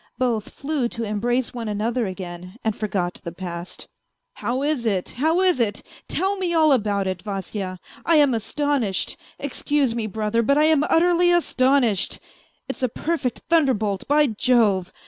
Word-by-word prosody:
Both 235 -4 0
flew 280 -4 -2
to 230 - -5
embrace 235 +4 -1
one 235 -2 -5
another 220 +2 -1
again 180 0 -7
and 220 -2 0
forgot 190 -4 -2
the 170 - -5
past. 175 0 -7 0.2
" - - -54
How 255 +3 -1
is 290 -4 0
it 200 -5 0
how 320 +8 +1
is 365 -6 +3
it? 215 -3 0 0.2
Tell 390 +1 0
me 355 -3 -1
all 315 -2 +5
about 205 -5 +1
it, 185 -2 -3
Vasya! 195 -1 -4 0.3
I 335 - +3
am 290 -4 +5
astonished, 235 -3 -1 0.2
excuse 285 -2 0
me, 230 -2 -2
brother, 215 +2 0
but 280 +5 +2
I 300 - +5
am 310 -2 +4
utterly 350 +2 +4
astonished; 260 - +2 0.5
it's 265 - -5
a 255 - +1
perfect 295 -1 -2
thunderbolt, 235 - +1
by 295 +1 +4
Jove 215 -6 +2
235 Hz, 165 wpm, -23 LUFS, 205-290 Hz, 0.5 s, all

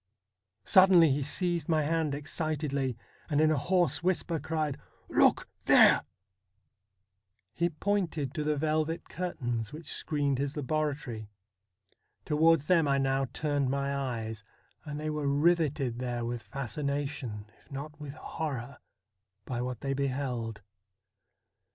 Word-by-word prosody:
Sud 190 - +7
denly 170 -5 +7
he 140 +2 +1
seized 170 +3 0
my 155 -2 +3
hand 155 -1 0
excitedly, 145 -4 -2 0.3
and 145 -2 +2
in 155 0 +5
a - - +3
hoarse 160 0 +1
whisper 170 -2 0
cried: 155 -1 -2 0.2
' - - -34
Look - - +4 0.2
there! - - +7 0.8
' - - -54 0.7
He 170 +1 +1
pointed 165 -5 -1
to 155 - -2
the 150 0 +1
velvet 155 +2 -1
curtains 120 -11 -3
which 155 +1 -5
screened 145 -3 0
his 140 +2 -2
laboratory. 145 -7 -2 1.0
Towards 160 0 +4
them 165 -1 +3
I 140 0 +3
now 135 0 +1
turned 145 -3 0
my 140 +1 -1
eyes, 115 -6 -3 0.4
and 150 -1 -5
they 155 0 -2
were 150 -2 -2
riveted 145 -4 +2
there 120 -2 -2
with 120 0 -3
fascination, 140 -4 -4
if - - -26
not 150 +2 -7
with 145 -2 -6
horror, 140 -6 -5 0.7
by 120 -2 -3
what 125 -2 -4
they 135 0 -1
beheld. 125 -5 -2
145 Hz, 135 wpm, -30 LUFS, 135-155 Hz, 1.0 s, Sud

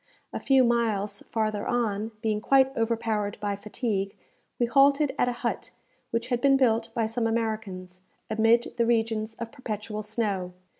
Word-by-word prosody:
A - - -3
few 270 -1 +4
miles 215 -4 0
farther 215 -2 -1
on, 220 -3 0
being 215 -1 0
quite 270 +2 +4
overpowered 225 -3 -1
by 205 -1 -1
fatigue, 200 -1 -3 0.4
we 240 - +2
halted 275 +3 +4
at 245 - +3
a 240 0 -6
hut - - -2 0.4
which 230 +2 -2
had 245 -2 0
been 275 0 +5
built 230 -3 +2
by 230 - +1
some 225 +1 -1
Americans, 215 -5 -3 0.3
amid 225 +2 +2
the 235 - +3
regions 225 -1 0
of 230 0 -6
perpetual 215 -5 -5
snow. 205 -4 -2
225 Hz, 155 wpm, -27 LUFS, 210-240 Hz, 0.4 s, been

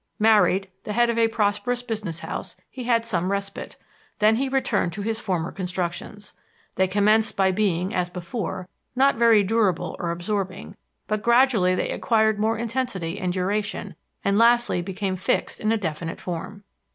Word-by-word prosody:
Married, 210 -3 +4 0.2
the 210 - -4
head 240 +1 +3
of 230 - -1
a 230 - +5
prosperous 225 +3 0
business 215 -8 -4
house, - - -6 0.2
he 255 -2 -7
had 230 -1 +2
some 185 -4 -1
respite; 200 0 -4 0.4
then 215 +1 +4
he 270 +2 0
returned 250 -9 0
to 200 +3 -5
his 225 +1 -1
former 175 -4 -2
constructions. 185 +2 -5 0.4
"They 190 - +2
commenced 210 +3 +2
by 190 -1 +3
being, 185 -2 0
as 180 -1 0
before, 180 +1 -5 0.3
not 275 +2 +4
very 230 -3 +5
durable 200 -3 +1
or 175 - -2
absorbing; 185 +2 -3 0.3
but 215 -1 -2
gradually 235 -7 +4
they - - -1
acquired 220 -2 +2
more 220 +1 +1
intensity 225 -7 -3
and 180 -2 -1
duration, 200 +3 -2 0.3
and 200 +1 +3
lastly 235 -5 +4
became 190 +1 -3
fixed 185 - -1
in 215 - 0
a 225 - +2
definite 165 -3 -4
form." 190 +4 -6
205 Hz, 165 wpm, -24 LUFS, 185-225 Hz, 0.4 s, a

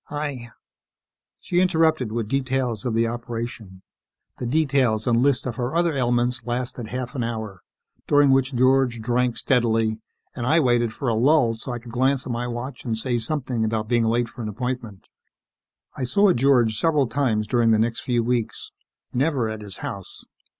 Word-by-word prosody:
I 145 -5 -4 0.5
" - - -65
She 175 - 0
interrupted 160 - +2
with 115 -1 -2
details 130 -3 -1
of 115 - -1
the 115 +1 +3
operation. 115 -4 -6 0.6
The 125 - -3
details 135 -6 +1
and 120 -2 +2
list 140 0 +2
of 120 -3 -4
her 125 +5 -2
other 170 -1 +2
ailments 120 -2 0
lasted 120 -1 -3
half 125 +2 -5
an 125 - -2
hour, 110 -5 -5 0.5
during 145 -1 +5
which 135 0 +2
George 130 -1 +3
drank 120 +1 0
steadily 115 -3 +1 0.3
and 120 -1 -3
I 160 +4 +4
waited 120 -5 +2
for 135 - -5
a 115 - +2
lull 125 +1 +3
so 115 +3 -7
I 120 - -3
could 120 0 -11
glance 130 +2 +1
at 130 - -4
my 120 +1 -2
watch 120 +2 -6
and 115 -3 -2
say 120 +1 -1
something 125 -1 -2
about 110 0 -1
being 120 0 +2
late 115 +1 +1
for 120 - -10
an 110 - -3
appointment. 120 -3 -5 0.9
I 130 - -2
saw 195 +9 +4
George 120 -4 +3
several 150 -4 +2
times 115 -4 0
during 120 +1 +2
the 110 - +5
next 115 +1 0
few 120 -2 0
weeks. 120 -1 -2 0.4
Never 130 -3 +1
at 110 0 -6
his 100 -2 -6
house. 100 -2 -7
120 Hz, 180 wpm, -23 LUFS, 115-135 Hz, 0.9 s, during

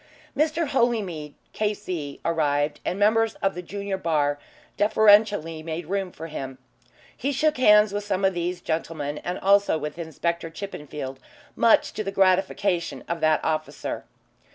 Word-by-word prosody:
Mr. 315 +2 +1
Holymead, 205 - 0 0.2
K.C., 185 -9 -3
arrived, 150 -3 +1
and 180 - -2
members 220 +2 +3
of 195 0 0
the 180 - -5
junior 200 +2 -4
bar 145 -4 +1 0.4
deferentially 205 -6 +4
made 160 +1 -5
room 190 +1 -2
for 160 - -8
him. 135 -5 -6 0.6
He 275 +4 -2
shook 305 +3 +1
hands 210 -4 +6
with 205 0 -2
some 195 -1 0
of 190 - +3
these 175 +1 -3
gentlemen 155 -2 -3
and 180 +1 -4
also 200 -3 +3
with 150 +2 -6
Inspector 170 +1 -3
Chippenfield, 150 -7 -7 0.4
much 230 - +4
to 215 - -3
the 195 - -3
gratification 190 -1 +1
of 170 0 -2
that 155 -1 +2
officer. 155 -2 -3
180 Hz, 145 wpm, -25 LUFS, 155-205 Hz, 0.6 s, hands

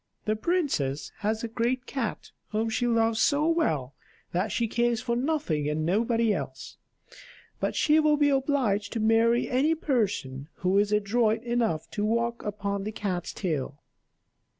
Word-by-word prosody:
The 215 - +1
princess 220 - -1
has 220 +2 -1
a - - -1
great 240 +3 -1
cat 250 -6 -4 0.2
whom 220 +1 -1
she 245 +2 0
loves 225 -1 +2
so 295 +2 +3
well 155 - 0 0.4
that 185 +4 -1
she 230 +2 0
cares 235 +1 +1
for 240 -1 -1
nothing 245 - 0
and 155 +1 -1
nobody 225 +4 +2
else; 135 -6 -6 0.8
but - - -1
she 310 +1 +4
will 305 -1 +3
be 290 0 +3
obliged 260 -7 +1
to 230 - -2
marry 225 +2 +3
any 285 +6 +2
person 195 - -1 0.2
who 190 +2 +4
is 205 0 +1
adroit 215 +2 +1
enough 235 -10 0
to 210 - -2
walk 235 +2 0
upon 200 -1 -3
the 215 - -3
cat's 185 -5 -3
tail." 145 -7 -3
225 Hz, 155 wpm, -27 LUFS, 200-245 Hz, 0.8 s, she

